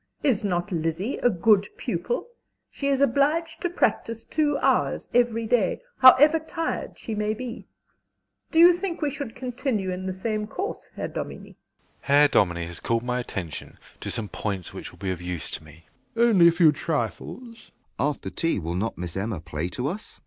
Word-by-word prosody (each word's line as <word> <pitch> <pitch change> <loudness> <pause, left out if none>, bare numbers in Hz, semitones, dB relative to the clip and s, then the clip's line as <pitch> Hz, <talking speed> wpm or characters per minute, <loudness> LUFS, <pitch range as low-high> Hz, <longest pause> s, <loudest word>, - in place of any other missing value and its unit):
Is 255 -9 +2
not 180 0 -1
Lizzie 165 - -1
a 245 - +3
good 205 +1 +3
pupil? 485 - -2 0.5
She 280 - -3
is 275 -1 +2
obliged 295 +5 +2
to 350 - 0
practise 230 -9 0
two 295 -2 +1
hours - - +1
every 235 -2 +2
day, 240 - +1 0.2
however 290 +5 +8
tired 325 +1 -4
she 225 - -6
may 210 0 -1
be. 250 +1 -7 0.8
Do 320 - -2
you 345 +2 +9
think 355 -1 -3
we 290 - +1
should 275 -4 -6
continue 245 -6 -2
in 185 +1 -4
the - - -1
same 210 +2 -2
course, 385 - -5
Herr - - -3
Dominie? - - -6 0.5
SHEPARD. - - -19
Herr 145 +1 +6
Dominie 85 -7 +2
has 85 0 -9
called 115 0 0
my 125 0 -1
attention 90 - -6 0.2
to - - -5
some 110 - -2
points 100 -3 -4
which - - -7
will - - -17
be 95 -2 -3
of 90 -2 -5
use 90 -4 -4
to - - -5
me. 80 +1 -16 0.3
DOMINIE. 235 +1 +4
Only 175 -4 +7
a - - +7
few 165 -2 +5
trifles. 145 -6 -3
JOHN 240 - -11
S. 230 - -18 0.3
After 140 -7 -1
tea 165 - 0
will 85 -3 -3
not 105 +6 -2
Miss 85 -1 -5
Emma 100 -1 -2
play 80 +1 -4
to 125 +7 -4
us? 185 +9 -4
195 Hz, 190 wpm, -25 LUFS, -, 0.8 s, you